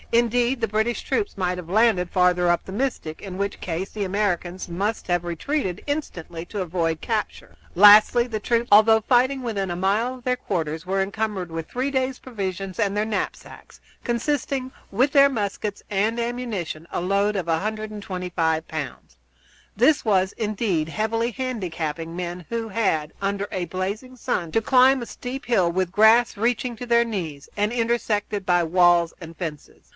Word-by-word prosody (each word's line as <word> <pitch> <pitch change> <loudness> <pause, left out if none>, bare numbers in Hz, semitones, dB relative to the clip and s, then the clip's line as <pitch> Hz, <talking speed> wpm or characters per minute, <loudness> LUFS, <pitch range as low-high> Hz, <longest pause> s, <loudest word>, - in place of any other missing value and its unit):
Indeed, 240 +2 +2
the 225 - 0
British 220 +3 -1
troops 405 - -1
might 180 -1 -1
have 180 -2 -7
been 185 - -4
landed 215 -6 +3
further 180 -1 +3
up 175 - +1
the - - -8
Mystic, 210 -10 -3
in 190 -2 -7
which 200 +1 -3
case 180 +2 -3
the 210 - -3
Americans 185 -2 -1
must 200 +6 -2
have 175 -1 +1
retreated 185 - -2
instantly 175 - -4
to 205 +2 -5
avoid 165 -2 -1
capture. 220 +3 -3 0.2
Lastly, 210 +5 +7
the 220 -3 -3
troops, 235 +2 0
although 220 +1 +7
fighting 255 +4 +2
within 200 -6 -2
a - - -2
mile 210 +7 +1
of 250 - -14
their 250 0 +2
quarters, 160 -8 -3
were 195 +1 0
encumbered 200 -2 -2
with 165 -1 -6
three 260 +3 -2
days' 260 -1 -1
provisions 195 -5 -5
and 205 -2 +1
their 210 - +1
knapsacks, 220 -1 -5 0.2
constituting, 260 +2 -1 0.2
with 255 +8 +2
their 280 -1 +7
muskets 205 -3 -3
and 215 +4 0
ammunition, 230 -10 -4
a - - -1
load 200 +3 +1
of 180 -3 -3
125 180 -3 -2
pounds. 145 - -6 0.6
This 270 +7 +4
was, 190 -3 +2
indeed, 210 -7 -1
heavily 225 +5 -1
handicapping 170 - -4
men 175 -1 -5
who 230 -1 -2
had, 190 -8 0
under 200 0 -1
a 185 - -3
blazing 205 +9 -4
sun, 170 -7 -2
to 225 - +2
climb 260 +3 +5
a - - -4
steep 260 +3 -7
hill, 190 -8 +2
with 185 0 -1
grass 220 +4 +5
reaching 235 +3 0
to 245 - -6
their 235 0 +3
knees, 165 -10 -5
and 210 +1 0
intersected 225 -4 -1
by 175 -2 +3
walls 175 0 +4
and 165 -1 -10
fences. 155 -5 -7
205 Hz, 170 wpm, -24 LUFS, 180-235 Hz, 0.6 s, Lastly